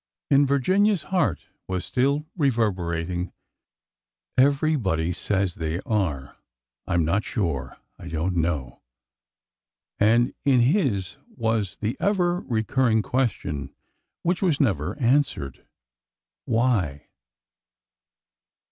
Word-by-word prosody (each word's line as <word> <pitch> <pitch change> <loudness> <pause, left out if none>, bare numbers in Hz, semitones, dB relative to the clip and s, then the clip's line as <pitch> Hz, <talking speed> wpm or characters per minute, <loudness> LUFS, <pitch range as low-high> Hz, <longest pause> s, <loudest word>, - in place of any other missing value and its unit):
In 140 0 +5
Virginia's 185 +8 +2
heart 180 - 0 0.2
was 95 -1 -3
still 140 +4 +1
reverberating, 90 - 0 1.0
Everybody 130 - +2
says 95 -2 -1
they 80 +1 -3
are.... 85 -12 -2 0.5
I 95 - 0
am 85 +4 +2
sure 95 -6 -3 0.2
I 85 - -9
don't 85 +2 -2
know," 80 -7 -2 1.2
and 115 +4 +4
in 135 -4 +4
his 120 - +1 0.2
was 110 - -1
the 110 +6 -3
ever 180 -3 +1
recurring 110 -1 +1
question 95 - -2 0.5
which 175 +1 0
was 170 -7 +2
never 95 - 0
answered—'' 130 - 0 0.8
Why? 105 - 0
110 Hz, 95 wpm, -25 LUFS, 85-140 Hz, 1.2 s, In